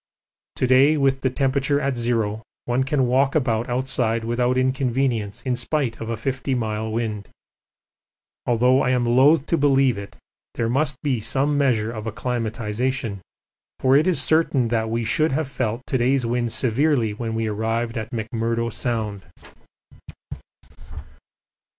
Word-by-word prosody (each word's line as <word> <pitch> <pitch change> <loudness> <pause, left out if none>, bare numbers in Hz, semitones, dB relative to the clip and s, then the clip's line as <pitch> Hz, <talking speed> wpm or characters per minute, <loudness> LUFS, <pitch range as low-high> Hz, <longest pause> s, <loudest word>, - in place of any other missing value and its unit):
To - - 0
day 135 +4 +5
with 135 -1 +1
the 130 - +1
temperature 140 +2 0
at 140 -2 -1
zero 115 -3 -1 0.2
one 125 +2 +1
can 135 -1 +1
walk 135 +3 +2
about 120 -5 0
outside 120 -3 0
without 120 +2 0
inconvenience 130 -4 -1
in 130 -2 0
spite 125 -1 -2
of 115 - -5
a 115 - -2
50 130 +2 -2
mile 110 -2 -2
wind. 110 -3 -3 1.2
Although 125 +2 +3
I - - +1
am 125 -1 +1
loath 135 +5 +4
to 165 - 0
believe 135 -5 +3
it 100 - -10 0.4
there 115 -1 -1
must 135 +3 +1
be 135 -5 0
some 135 +6 0
measure 120 -6 +1
of 110 -1 -6
acclimatisation, 115 0 -3 0.6
for 130 +1 +3
it 150 +5 +4
is 185 - +3
certain 155 -7 +2 0.2
we 115 +1 -1
should 155 +6 +1
have 155 +1 -1
felt 125 -2 -3
to 130 - -1
day's 130 +1 +2
wind 120 0 -1
severely 125 0 +1
when 115 +1 -4
we 115 0 -1
first 105 -1 -3
arrived 115 +1 -1
in 110 - -3
McMurdo 115 0 -2
Sound. 110 -6 -2
125 Hz, 150 wpm, -22 LUFS, 115-135 Hz, 1.2 s, day